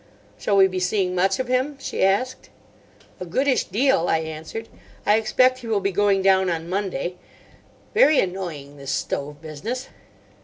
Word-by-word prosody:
"Shall 200 Hz, -, +1 dB
we 195 Hz, -, +8 dB
be 185 Hz, -1 st, -3 dB
seeing 180 Hz, 0 st, 0 dB
much 190 Hz, +1 st, +2 dB
of 260 Hz, -, -2 dB
him?" 260 Hz, +3 st, 0 dB
she -, -, -2 dB
asked. 200 Hz, +7 st, 0 dB, 0.7 s
"A 180 Hz, -, -5 dB
goodish 260 Hz, +9 st, +1 dB
deal," 220 Hz, -3 st, +2 dB
I -, -, +3 dB
answered. 160 Hz, +7 st, -6 dB, 0.4 s
"I 210 Hz, -, +5 dB
expect 255 Hz, +4 st, +3 dB
he 240 Hz, -, -9 dB
will 220 Hz, -2 st, +1 dB
be 195 Hz, 0 st, -1 dB
going 200 Hz, 0 st, +2 dB
down 190 Hz, -1 st, +4 dB
on 165 Hz, -1 st, -3 dB
Monday. 180 Hz, -2 st, -3 dB, 0.8 s
Very 415 Hz, -, +5 dB
annoying, 170 Hz, -7 st, -4 dB
this 140 Hz, -1 st, -8 dB
stove 145 Hz, +3 st, -3 dB
business." 215 Hz, -, -5 dB
195 Hz, 160 wpm, -23 LUFS, 175-230 Hz, 0.8 s, we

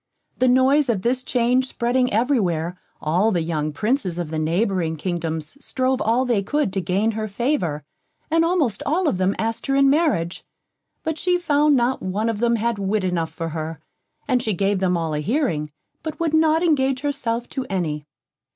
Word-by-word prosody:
The 255 Hz, -, +4 dB
noise 260 Hz, +3 st, +4 dB
of 200 Hz, -5 st, 0 dB
this 250 Hz, +2 st, +1 dB
change 255 Hz, 0 st, +1 dB
spreading 250 Hz, +1 st, 0 dB
every 245 Hz, +5 st, +2 dB
where, 170 Hz, -2 st, -1 dB, 0.3 s
all 175 Hz, +8 st, +2 dB
the 175 Hz, -6 st, 0 dB
young 155 Hz, -2 st, -2 dB
Princes 210 Hz, -, -1 dB
of 170 Hz, -3 st, -4 dB
the 160 Hz, -, -2 dB
neighbouring 170 Hz, 0 st, 0 dB
kingdoms 165 Hz, -, -4 dB
strove 260 Hz, 0 st, 0 dB
all 235 Hz, +4 st, +2 dB
they 235 Hz, -5 st, +1 dB
could 290 Hz, 0 st, -1 dB
to 195 Hz, -, 0 dB
gain 195 Hz, +6 st, +1 dB
her 215 Hz, 0 st, -3 dB
favour, 195 Hz, -, -1 dB, 0.5 s
and 330 Hz, +1 st, +4 dB
almost 330 Hz, -, +1 dB
all 335 Hz, +4 st, +1 dB
of 185 Hz, -, 0 dB
them 190 Hz, +1 st, +1 dB
asked 225 Hz, +3 st, -2 dB
her 275 Hz, -, +1 dB
in 275 Hz, 0 st, +5 dB
marriage; 270 Hz, -, +1 dB, 0.6 s
but 320 Hz, -1 st, -2 dB
she 360 Hz, -1 st, +2 dB
found 300 Hz, -3 st, +3 dB
not 250 Hz, +1 st, +1 dB
one 205 Hz, +5 st, -1 dB
of 220 Hz, -2 st, -2 dB
them 235 Hz, 0 st, +2 dB
had 230 Hz, -1 st, -1 dB
wit 200 Hz, +1 st, 0 dB
enough 175 Hz, -3 st, -1 dB
for 165 Hz, 0 st, -4 dB
her, 160 Hz, 0 st, -5 dB, 0.5 s
and 255 Hz, -3 st, +2 dB
she 220 Hz, -3 st, -1 dB
gave 195 Hz, +1 st, +1 dB
them 180 Hz, -2 st, +1 dB
all 165 Hz, -2 st, -2 dB
a 150 Hz, -, -1 dB
hearing, 160 Hz, -, -1 dB, 0.3 s
but 310 Hz, -2 st, -6 dB
would 330 Hz, -2 st, 0 dB
not 315 Hz, +1 st, +3 dB
engage 270 Hz, -5 st, +2 dB
herself 245 Hz, -5 st, -2 dB
to 260 Hz, -1 st, -4 dB
any. 155 Hz, -6 st, -2 dB
225 Hz, 190 wpm, -22 LUFS, 175-270 Hz, 0.6 s, in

